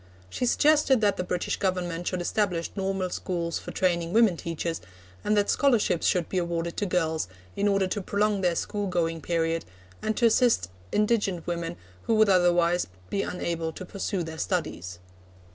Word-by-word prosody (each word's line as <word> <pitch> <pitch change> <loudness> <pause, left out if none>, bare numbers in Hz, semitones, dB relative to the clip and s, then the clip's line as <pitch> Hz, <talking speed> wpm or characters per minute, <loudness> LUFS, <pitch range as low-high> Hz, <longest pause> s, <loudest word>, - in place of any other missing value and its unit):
She 250 - -1
suggested 290 -1 +4
that 205 -2 +2
the - - -1
British 180 -1 -2
Government 175 -3 -2
should 185 -1 -1
establish 175 -2 0
normal 195 -2 -1
schools 170 -3 -2
for - - -9
training 170 -2 0
women 225 -5 +5
teachers, 165 0 -4 0.4
and 210 - +2
that 205 0 +3
scholarships 235 - +2
should 175 -3 +2
be 185 - -1
awarded 170 -1 -2
to 205 - 0
girls 160 - 0 0.3
in 200 - +1
order 195 -1 +3
to 200 +2 -2
prolong 205 +1 +1
their 175 -2 +2
school 205 +4 -2
going 165 -3 -1
period, 165 0 0 0.4
and 215 -1 -1
to 240 - +3
assist 225 - +3 0.2
indigent 205 -5 +1
women 170 -1 -3 0.3
who 225 - +3
would 215 -1 +5
otherwise 175 -1 +3 0.2
be 195 - +1
unable 170 -3 -2
to 185 - -8
pursue 195 0 -3
their 160 0 -7
studies. 95 - -2
180 Hz, 170 wpm, -27 LUFS, 170-205 Hz, 0.4 s, women